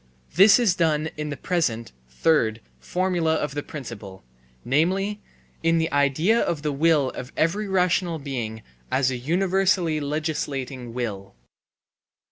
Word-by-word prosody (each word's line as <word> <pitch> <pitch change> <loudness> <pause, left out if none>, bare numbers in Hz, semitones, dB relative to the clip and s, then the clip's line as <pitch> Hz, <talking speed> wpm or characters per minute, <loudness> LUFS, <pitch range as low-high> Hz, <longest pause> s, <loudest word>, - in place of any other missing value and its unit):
This 195 +5 +7
is 235 -7 +3
done 160 -3 0
in 150 0 -4
the 145 - -5
present 130 -11 -1 0.2
(third) 110 - +1 0.2
formula 175 - 0
of 150 -3 -2
the 145 - -2
principle, 115 -11 -9 0.4
namely, 190 +10 +1 0.4
in 165 0 +2
the 160 0 0
idea 145 - +2
of 155 -8 -1
the 150 - 0
will 145 -2 +2
of 125 +2 -8
every 200 +7 +1
rational 180 -2 +1
being 120 -7 -5 0.3
as 130 -1 +2
a - - -2
universally 180 +3 +1
legislating 140 -5 -3
will. 100 - -4
155 Hz, 130 wpm, -24 LUFS, 130-175 Hz, 0.4 s, This